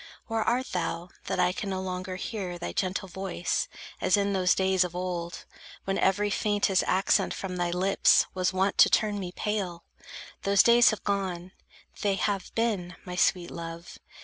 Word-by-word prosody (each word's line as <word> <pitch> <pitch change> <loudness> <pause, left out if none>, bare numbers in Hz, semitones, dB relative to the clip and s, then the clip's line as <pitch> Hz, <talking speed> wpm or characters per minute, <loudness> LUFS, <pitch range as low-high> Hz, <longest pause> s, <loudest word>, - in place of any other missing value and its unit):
Where 225 -2 -1
art 245 +4 0
thou, 175 -1 -3 0.2
that - - -1
I 180 0 +3
can 200 +2 -4
no 190 -1 -2
longer 185 0 -4
hear 185 -2 -4
Thy 175 - -5
gentle 190 +1 -2
voice, 185 -1 -2 0.3
as 185 - +3
in 200 0 +1
those 185 -2 +3
days 190 -1 +3
of 175 -1 -6
old, 175 -2 -4 0.4
When 195 0 -1
every 205 +2 +2
faintest 205 -3 +1
accent 190 +2 +2
from 185 -2 -5
thy 175 -1 0
lips 185 +3 +3
Was 185 -1 0
wont 190 +1 0
to - - +8
turn 210 -2 +1
me 180 -2 -5
pale? 190 -4 -3 0.6
Those 200 0 +4
days 235 0 +6
have 215 - -3
gone. 185 -3 -2 0.5
They 200 -2 +1
have 195 0 -2
been, 200 -7 -1
my 180 -1 -6
sweet 180 -1 +1
love! 170 0 -8
190 Hz, 175 wpm, -28 LUFS, 180-200 Hz, 0.6 s, to